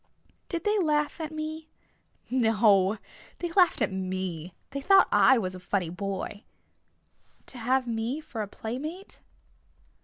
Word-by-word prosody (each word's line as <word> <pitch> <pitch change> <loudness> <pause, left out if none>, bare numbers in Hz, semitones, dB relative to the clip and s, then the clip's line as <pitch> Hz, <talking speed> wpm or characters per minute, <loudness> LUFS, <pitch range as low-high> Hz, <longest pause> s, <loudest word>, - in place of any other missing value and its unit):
"Did 340 -2 -3
they 420 0 +2
laugh 300 -2 +1
at 315 -1 -4
me?" 310 0 -5 0.3
"... - - -37 0.2
No, 205 -2 +4 0.4
they 345 -1 -4
laughed 360 -1 +4
at - - 0
me. 185 -3 -4 0.2
They 275 - -4
thought 390 +6 +6
I 265 - +6
was 185 -5 -2
a 185 - -7
funny 180 -2 -1
boy." 195 +2 -4 1.0
"To 250 - -8
have 255 +3 +1
me 235 +4 -2
for 300 -8 -6
a 210 - -3
playmate?" 290 - -6
235 Hz, 145 wpm, -28 LUFS, 195-310 Hz, 1.0 s, thought